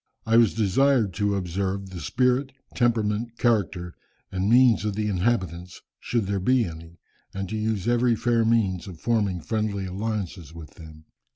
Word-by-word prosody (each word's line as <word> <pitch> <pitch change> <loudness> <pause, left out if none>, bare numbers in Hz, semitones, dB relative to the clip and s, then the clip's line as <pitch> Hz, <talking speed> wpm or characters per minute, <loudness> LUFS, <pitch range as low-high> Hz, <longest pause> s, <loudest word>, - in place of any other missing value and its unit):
I 115 - +2
was 115 -3 +5
desired 115 0 +2
to 105 +1 0
observe 95 +1 -3
the 90 - -7
spirit, 130 +6 0 0.2
temperament, 115 -1 0
character, 95 -7 0 0.4
and 95 +1 -1
means 120 -2 +5
of 105 -2 -2
the 105 0 -1
inhabitants, 90 -4 -2 0.2
should 115 -4 -1
there 100 0 -1
be 125 +5 +2
any, 85 0 -10 0.4
and 95 0 -3
to 110 - -4
use 110 -1 -2
every 120 0 +3
fair 115 0 +1
means 100 -6 +1
of 90 -4 -9
forming 105 -5 0
friendly 105 0 -2
alliances 95 -4 -4
with 80 -2 -10
them. 80 -1 -14
105 Hz, 160 wpm, -25 LUFS, 90-115 Hz, 0.4 s, was